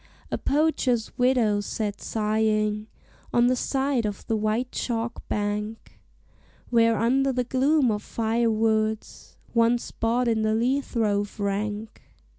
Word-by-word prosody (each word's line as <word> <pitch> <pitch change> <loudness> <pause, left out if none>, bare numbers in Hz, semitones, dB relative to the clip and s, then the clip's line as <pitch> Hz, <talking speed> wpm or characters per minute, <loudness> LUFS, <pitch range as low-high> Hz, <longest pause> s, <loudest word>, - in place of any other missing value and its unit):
A - - 0
poacher's 275 -6 +1
widow 245 -5 +3
sat 205 0 -4
sighing 215 -1 0 0.4
On 240 0 +4
the 255 +1 +3
side 270 -1 0
of 205 -2 -4
the 225 - 0
white 220 +4 -1
chalk 235 -1 -3
bank, 210 +1 -3 0.7
Where, 230 -1 +4
under 265 +5 +2
the 250 -1 0
gloom 265 +1 +2
of 210 -1 -2
fire 230 +2 0
woods, 220 0 -1 0.2
One 230 +1 +4
spot 235 +1 -1
in 225 -1 +1
the 215 0 +1
lea 255 +5 +1
throve 210 -5 -1
rank. 205 +2 -3
225 Hz, 130 wpm, -25 LUFS, 215-245 Hz, 0.7 s, On